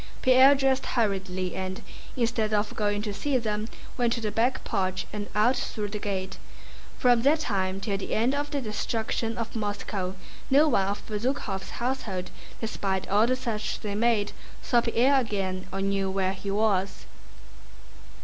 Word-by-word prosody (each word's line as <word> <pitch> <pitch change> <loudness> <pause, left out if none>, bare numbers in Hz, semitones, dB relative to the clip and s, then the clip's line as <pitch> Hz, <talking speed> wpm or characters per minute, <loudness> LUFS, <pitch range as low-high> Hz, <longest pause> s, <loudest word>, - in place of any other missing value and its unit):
Pierre 260 +2 +7
dressed 270 -1 +1
hurriedly 190 -5 -1
and, 190 0 -4 0.3
instead 225 -3 +1
of 205 0 0
going 205 -1 0
to 210 -2 -3
see 275 +6 0
them, 215 -2 -2 0.3
went 240 -1 +3
to 240 - -2
the 215 -2 -1
back 235 +5 +1
porch 185 -4 -1
and 205 -1 -4
out 230 +5 +4
through 210 -4 -3
the 210 +1 -4
gate. 190 -2 -3 0.6
From 245 -2 +4
that 295 +5 +4
time 190 -6 -1
till 200 0 -1
the - - -3
end 235 +5 +2
of 290 +1 -1
the 285 -2 -2
destruction 225 0 -2
of 230 -1 -4
Moscow 205 -3 -3 0.3
no 290 +4 +6
one 195 -10 +2
of 200 +1 -3
Bezúkhov's 215 -3 -2
household, 235 -7 -3 0.3
despite 195 -4 -2
all 210 +3 +4
the 255 - +2
search 230 -5 -3
they 205 -1 -3
made, 215 -1 +2 0.3
saw 240 - +3
Pierre 250 +4 +3
again 195 -6 -2
or 195 +1 -3
knew 195 0 0
where 190 0 0
he 195 +1 -6
was. 200 -2 +1
215 Hz, 165 wpm, -27 LUFS, 195-240 Hz, 0.6 s, Pierre